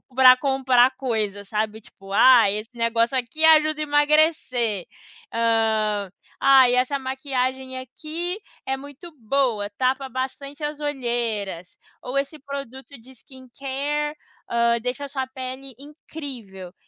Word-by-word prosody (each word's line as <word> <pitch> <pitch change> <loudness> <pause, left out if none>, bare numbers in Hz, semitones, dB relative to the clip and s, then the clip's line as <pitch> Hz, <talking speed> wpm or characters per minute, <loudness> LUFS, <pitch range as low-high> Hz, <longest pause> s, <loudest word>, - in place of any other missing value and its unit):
pra 255 -1 +8
comprar 260 -2 +3
coisas, 210 -6 -2
sabe, 215 0 -2
tipo, 195 -2 -13
ah, 230 0 +7
esse 210 +3 -4
negócio 230 +1 +1
aqui 255 +6 -3
ajuda 310 -1 +5
a - - +1
emagrecer, 290 - +2 0.5
hã, 220 -3 +1 0.3
ai 265 -2 +6
essa 255 +3 +1
maquiagem 260 -1 -3
aqui 315 - -5 0.3
é 265 - -1
muito 285 +5 -11
boa, 230 -3 0
tapa 265 +1 0
bastante 270 +3 -5
as 295 0 -3
olheiras, 235 - -3 0.2
ou 255 +2 -4
esse 280 +3 -2
produto 275 0 -8
de 245 +3 -17
skin 260 0 -15
care 290 +2 -2 0.7
deixa 250 +4 -3
a - - -6
sua 265 -1 -3
pele 260 0 -8
incrível, 260 - -10
260 Hz, 125 wpm, -23 LUFS, 230-280 Hz, 0.7 s, pra